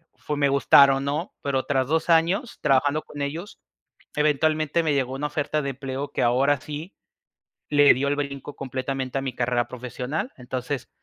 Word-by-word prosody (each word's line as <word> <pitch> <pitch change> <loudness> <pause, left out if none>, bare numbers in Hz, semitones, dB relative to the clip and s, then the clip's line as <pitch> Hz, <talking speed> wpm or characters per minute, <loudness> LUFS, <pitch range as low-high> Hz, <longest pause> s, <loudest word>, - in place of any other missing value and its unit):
fue 150 -1 -4
me 140 - +3
gustara 140 0 +6
o 135 - -1
no, 140 +2 -3
pero 135 -2 0
tras 130 -2 +1
2 160 +2 0
años 175 +8 +2
trabajando 145 +1 +2
con 145 - -9
ellos, 165 +8 -6 0.6
eventualmente 155 +2 +2
me 155 -3 +1
llegó 130 -2 0
una 140 +2 -2
oferta 150 +1 -1
de 140 - -3
empleo 135 +1 -5
que - - -1
ahora 130 +3 +3
sí 155 +5 -7 0.7
le 145 -1 +6
dio 135 +3 -1
el 145 - +1
brinco 140 0 -5
completamente 130 0 -3
a - - -3
mi 130 -3 -4
carrera 120 -1 0
profesional. 125 - -4
Entonces 125 +1 -4
140 Hz, 175 wpm, -24 LUFS, 130-150 Hz, 0.7 s, gustara